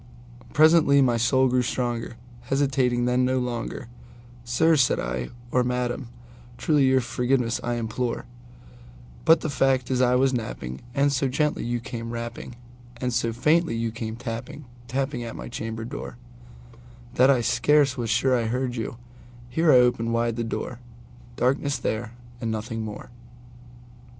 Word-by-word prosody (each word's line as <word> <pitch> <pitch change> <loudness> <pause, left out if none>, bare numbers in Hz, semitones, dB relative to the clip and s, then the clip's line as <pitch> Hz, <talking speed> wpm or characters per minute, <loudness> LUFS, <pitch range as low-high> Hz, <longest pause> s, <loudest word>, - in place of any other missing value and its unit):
Presently 155 -2 +5
my 120 -2 +2
soul 130 +3 +3
grew 125 0 +2
stronger; 120 -1 -2 0.3
hesitating 130 -3 +1
then 125 +1 +2
no 130 +1 +1
longer,"Sir," 120 +3 -2
said 135 -4 +3
I, 60 +1 -3 0.2
"or 125 - +3
Madam, 125 +1 -2 0.5
truly 150 -3 +2
your 130 0 +4
forgiveness 125 -1 0
I 120 0 -1
implore; 120 +1 -3 1.0
But 165 +1 +6
the 155 - -2
fact 135 -2 +1
is 130 -1 +2
I 125 0 +4
was 135 +1 +3
napping, 65 - -4
and 140 0 +3
so 135 0 +1
gently 150 +3 0
you 120 0 -1
came 115 0 -6
rapping, 115 0 -6 0.4
And 125 0 -2
so 115 0 0
faintly 155 +5 +2
you 115 0 -1
came 110 -1 -5
tapping, 120 +5 -6 0.2
tapping 135 0 -2
at 115 - -6
my - - -7
chamber 110 - -5
door, 130 -1 -7 1.0
That 130 +2 +5
I 130 -3 +4
scarce 145 +2 +3
was 120 -4 -3
sure 130 +3 +3
I 120 -2 0
heard 125 +2 -1
you"—here 120 +5 -3
I - - +8
opened 120 -2 +2
wide 115 0 0
the 120 - -2
door:—Darkness 115 - -3
there 110 +1 -3 0.3
and 115 - -2
nothing 110 +1 -3
more. 110 +1 -7
120 Hz, 145 wpm, -25 LUFS, 115-130 Hz, 1.0 s, I